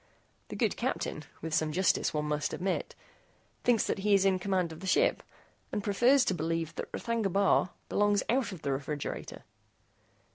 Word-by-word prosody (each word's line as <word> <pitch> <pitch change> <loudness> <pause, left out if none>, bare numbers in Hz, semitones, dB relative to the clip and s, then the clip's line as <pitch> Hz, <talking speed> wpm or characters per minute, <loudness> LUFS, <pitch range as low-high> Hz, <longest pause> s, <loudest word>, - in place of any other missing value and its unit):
The - - -7
good - - 0
captain, - - -2 0.2
with 160 -1 -4
some 155 0 +1
justice, 185 +4 +2
one 150 -1 -1
must 150 0 -1
admit, 185 +1 -2 0.7
thinks 240 -4 +3
that - - -1
he 205 +1 +3
is 195 0 +3
in 190 -1 +3
command 185 -3 0
of 160 - -9
the 190 - -7
ship, - - +3 0.5
and 210 - -2
prefers 245 +6 +4
to - - +1
believe 165 -1 -2
that - - -6
R'thagna 230 -4 -1
Bar 195 -1 +3 0.2
belongs 205 0 +2
out 240 -3 +1
of 180 -5 -9
the 140 - 0
refrigerator." 140 +2 -4
190 Hz, 175 wpm, -30 LUFS, 160-205 Hz, 0.7 s, prefers